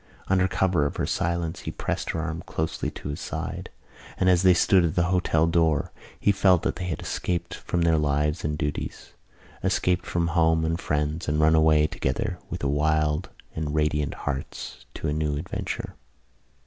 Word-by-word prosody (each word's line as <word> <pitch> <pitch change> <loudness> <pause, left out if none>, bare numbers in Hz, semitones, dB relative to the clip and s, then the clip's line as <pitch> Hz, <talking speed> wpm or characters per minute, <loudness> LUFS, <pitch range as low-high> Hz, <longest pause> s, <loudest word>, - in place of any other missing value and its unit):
Under 95 -1 +3
cover 90 -6 +2
of - - -6
her - - -1
silence 85 -1 -1
he - - -5
pressed - - -3
her - - -1
arm 80 0 -3
closely 80 0 -2
to - - -7
his 75 - -4
side; - - -5 0.5
and, 95 -1 +4
as 90 -1 +4
they 95 -1 +6
stood 95 +1 +4
at 80 -3 0
the 85 - +3
hotel 80 -3 +3
door, 80 -3 +2 0.3
he 100 - +4
felt 95 -3 +4
that - - -1
they 90 - -4
had 80 -4 -3
escaped 90 -1 -2
from 85 -1 -2
their 80 -2 +3
lives 75 +2 0
and 75 0 -1
duties, 75 -2 -4 0.5
escaped 90 0 +1
from 85 -1 0
home 80 -1 +3
and 80 +1 -1
friends 75 +3 -1
and 75 0 +1
run 80 +1 +5
away 80 -1 +5
together 100 +4 -2
with - - -5
wild 75 +3 +1 0.3
and 75 -1 -2
radiant 75 -2 +1
hearts 70 -2 -5
to - - -3
a 75 - 0
new 75 -1 -1
adventure. 80 +5 -4
80 Hz, 180 wpm, -26 LUFS, 75-90 Hz, 0.5 s, they